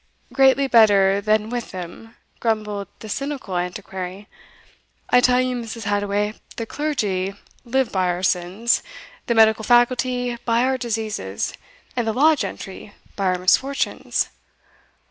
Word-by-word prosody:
"Greatly 270 0 +5
better 200 -5 +5
than 215 +1 +1
with 245 -1 -3
them," 185 +6 -9 0.2
grumbled 210 -3 -1
the 220 - -8
cynical 270 -4 -4
Antiquary. 185 +2 -5 0.8
"I 245 - +6
tell 250 0 +4
you, 255 0 0
Mrs. 230 -1 -6
Hadoway, 205 0 0 0.2
the 230 - -4
clergy 205 -10 -2 0.3
live 260 0 0
by 185 -2 +1
our 180 +1 -2
sins, 190 +6 +1 0.5
the 235 - +1
medical 220 0 +5
faculty 245 +1 +2
by 235 0 +2
our 260 0 +1
diseases, 215 - -3 0.4
and 240 -2 -1
the 220 - +1
law 305 +6 +5
gentry 205 -6 -6 0.2
by 200 - -2
our 185 0 +2
misfortunes." 260 +10 +1
220 Hz, 130 wpm, -22 LUFS, 195-245 Hz, 0.8 s, I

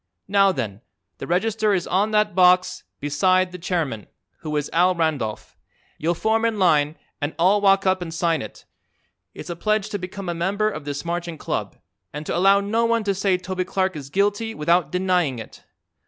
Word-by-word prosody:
Now, 195 0 +4
then, 110 - -4 0.4
the - - -6
register 210 +3 +1
is 180 - -1
on 200 +4 +1
that 210 -1 +2
box 180 0 +3
beside 185 +6 +2
the 180 - -8
chairman, 160 - -2 0.3
who 155 -4 -3
is 145 - -1
Al 180 +2 +3
Randolph. 150 -10 -2 0.4
You'll 170 +3 0
form 220 +5 +1
in 230 -2 +1
line 155 -5 +3 0.3
and 145 +1 -3
all 190 +5 +3
walk 195 -1 +4
up 185 -1 +2
and 170 -2 -5
sign 165 -2 0
it. 110 - -10 0.7
It's - - -7
a - - -4
pledge 215 +3 0
to 205 - -3
become 185 +1 -7
a 175 - -1
member 200 +5 0
of 150 - -7
this 145 +2 -5
Marching 170 -1 -3
Club - - -4 0.3
and 150 +1 -7
to - - -2
allow 195 +3 +5
no 220 +3 0
one 230 -1 +1
to 200 -1 0
say 195 -1 +1
Toby 185 0 -3
Clark 185 -1 -1
is 140 -3 -7
guilty 205 +6 0
without 170 0 +1
denying 180 -7 +1
it. 110 - -10
180 Hz, 190 wpm, -23 LUFS, 160-200 Hz, 0.7 s, allow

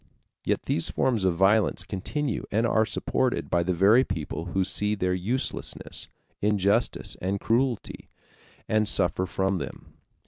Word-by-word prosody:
Yet - - 0
these 85 - 0
forms 115 -7 0
of 90 -2 +2
violence 100 +4 +3
continue 130 +7 -3
and 110 +3 +2
are 110 -1 +2
supported 130 -1 -1
by 85 - +3
the 90 +1 -1
very 105 +8 +5
people 80 - -4
who 95 +2 0
see 105 +2 0
their 90 -2 0
uselessness, 110 +9 -3 0.3
injustice, 105 +2 +1
and 95 +2 -1
cruelty, 120 +1 -1 0.6
and 110 -1 +2
suffer 95 -1 +1
from 95 +1 0
them. 70 -6 -8
100 Hz, 140 wpm, -26 LUFS, 90-110 Hz, 0.6 s, very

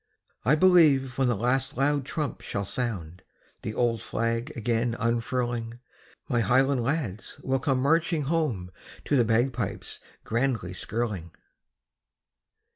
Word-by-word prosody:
I 135 +7 +4
believe 150 -7 +4
when 135 - +3
the 120 - +2
last 125 +4 0
loud 140 0 +1
trump 150 -1 -3
shall 100 0 -3
sound, 95 -8 -4 0.4
The 110 - -5
old 115 -3 +1
flag 115 +7 -2
again 115 +1 0
unfurling, 120 0 -1 0.5
My 120 - +1
highland 130 +2 +3
lads 120 - -3
will 135 0 +1
come 130 0 +1
marching 160 +1 +2
home 135 - -1 0.3
To 145 - +1
the 125 - +5
bagpipes 115 -1 -1 0.2
grandly 115 -6 -1
skirling. 100 -3 -3
120 Hz, 120 wpm, -27 LUFS, 115-135 Hz, 0.5 s, the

